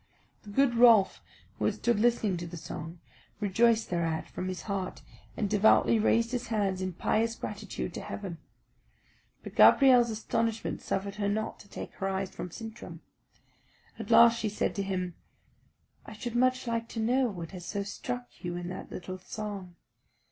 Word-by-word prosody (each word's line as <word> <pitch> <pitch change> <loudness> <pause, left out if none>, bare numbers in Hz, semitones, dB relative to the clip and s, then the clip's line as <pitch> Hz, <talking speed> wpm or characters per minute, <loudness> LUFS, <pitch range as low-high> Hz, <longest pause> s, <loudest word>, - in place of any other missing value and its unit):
The 210 - -13
good 255 +4 +3
Rolf, 230 -4 +6 0.4
who - - 0
had - - +1
stood 235 -3 +1
listening 225 -4 +2
to 170 0 -5
the 170 +1 -8
song, 165 +2 -7 0.4
rejoiced 220 +2 +2
thereat 165 -2 -1
from 185 - -5
his 185 -2 -4
heart, 195 -3 -4 0.3
and 210 - 0
devoutly 215 +2 +4
raised 230 +2 +2
his 250 -1 -3
hands 200 -4 0
in 185 -1 -2
pious 225 +6 0
gratitude 205 -5 -5
to - - -5
heaven. 185 -5 -6 1.0
But - - -8
Gabrielle's 250 -4 +7
astonishment 225 0 -2
suffered 200 +1 -3
her 200 -1 0
not 220 +2 -2
to - - -14
take - - -7
her 195 - -1
eyes 190 0 -2
from 180 - -6
Sintram. 225 +5 -9 1.0
At 225 -1 -6
last 235 0 +7
she 215 - -1
said 210 - -1
to - - +1
him, 185 -2 -2 0.9
"I - - -10
should 235 +2 -6
much 255 +1 +2
like 230 -1 -2
to 225 - -5
know 250 +4 +2
what 175 -7 -6
has 180 -2 -8
so 200 0 -2
struck 125 -11 -5 0.2
you 175 0 -3
in 175 0 -5
that 185 - -7
little 185 +1 -7
song. 195 -2 -6
205 Hz, 170 wpm, -29 LUFS, 185-230 Hz, 1.0 s, Gabrielle's